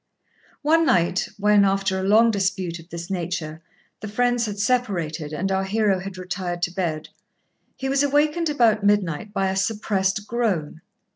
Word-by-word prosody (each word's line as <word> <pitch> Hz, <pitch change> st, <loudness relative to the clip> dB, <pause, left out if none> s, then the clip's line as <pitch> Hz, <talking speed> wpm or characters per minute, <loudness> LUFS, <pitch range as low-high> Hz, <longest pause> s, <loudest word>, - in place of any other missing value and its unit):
One 325 Hz, +3 st, +4 dB
night, 185 Hz, -, +2 dB
when, 210 Hz, 0 st, +4 dB
after 195 Hz, -1 st, +1 dB
a -, -, -3 dB
long 220 Hz, +4 st, +5 dB
dispute 190 Hz, -4 st, -2 dB
of 165 Hz, +1 st, -15 dB
this 170 Hz, +2 st, -7 dB
nature, 165 Hz, -3 st, -4 dB, 0.4 s
the 215 Hz, -, -7 dB
friends 245 Hz, +2 st, +1 dB
had 205 Hz, -1 st, -5 dB
separated 180 Hz, -, -1 dB
and 185 Hz, +6 st, -2 dB
our 190 Hz, 0 st, +1 dB
hero 200 Hz, -1 st, +1 dB
had 190 Hz, 0 st, -7 dB
retired 180 Hz, -1 st, -4 dB
to 180 Hz, -, 0 dB
bed, 165 Hz, -5 st, -3 dB, 0.7 s
he 270 Hz, -, -4 dB
was 270 Hz, +1 st, +2 dB
awakened 300 Hz, +3 st, +2 dB
about 235 Hz, -8 st, +2 dB
midnight 205 Hz, -2 st, +1 dB
by 195 Hz, -2 st, 0 dB
a -, -, -3 dB
suppressed 200 Hz, 0 st, 0 dB
groan. 200 Hz, -10 st, -2 dB
195 Hz, 160 wpm, -23 LUFS, 180-225 Hz, 0.7 s, long